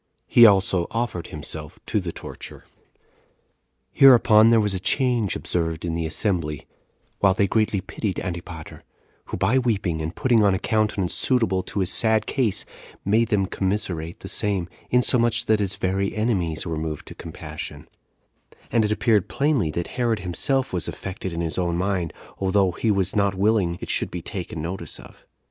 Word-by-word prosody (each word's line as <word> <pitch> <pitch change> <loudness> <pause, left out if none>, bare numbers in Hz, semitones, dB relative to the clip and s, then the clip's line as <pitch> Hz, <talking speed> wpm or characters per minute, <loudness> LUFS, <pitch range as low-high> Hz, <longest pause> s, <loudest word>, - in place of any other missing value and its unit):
He 120 -1 +7
also 95 -3 +3
offered 115 -7 -3
himself 75 0 -6
to 110 - 0
the 90 -3 -4
torture. - - -9
5. - - -30 1.2
Hereupon 115 -5 +7
there 115 -1 +5
was 105 -2 +1
a 95 - -1
change 120 -1 +1
observed 80 -1 -2
in 85 - -2
the 80 -1 -2
assembly, 80 -4 -1 0.5
while 95 -2 +4
they 100 - +3
greatly 105 -1 +1
pitied 100 0 -4
Antipater, 85 -2 -7 0.4
who - - -5
by 130 +4 +2
weeping 100 -10 -1
and 80 +3 -4
putting 120 -5 +3
on 100 -2 +4
a - - 0
countenance 105 -3 0
suitable 115 -8 +2
to 100 - -3
his 95 0 0
sad 110 -1 +2
case 110 -7 0 0.4
made 110 +4 +3
them 100 -4 +2
commiserate 95 -4 -3
the - - -7
same, 100 -4 0 0.2
insomuch 120 -1 +2
that 110 -1 +2
his 100 -1 -1
very 95 +1 -1
enemies 95 -8 -1
were 80 -3 -3
moved 80 -1 -5
to - - -10
compassion; 75 -3 -8 0.8
and 115 - +3
it 105 - 0
appeared 105 -3 +2
plainly 140 - +1
that 85 +3 -3 0.2
Herod 115 -2 +2
himself 130 +9 -1
was 90 - -1
affected 95 -1 -6
in 85 0 -3
his 85 +1 -2
own 85 -1 0
mind, 90 -3 -1 0.3
although 95 -1 +2
he 110 +6 -2
was 95 -4 +1
not 100 -2 +2
willing 95 -3 +1
it - - -3
should - - +1
be - - -6
taken 75 - -6
notice 90 +3 -5
of. - - -16
95 Hz, 170 wpm, -23 LUFS, 85-110 Hz, 1.2 s, He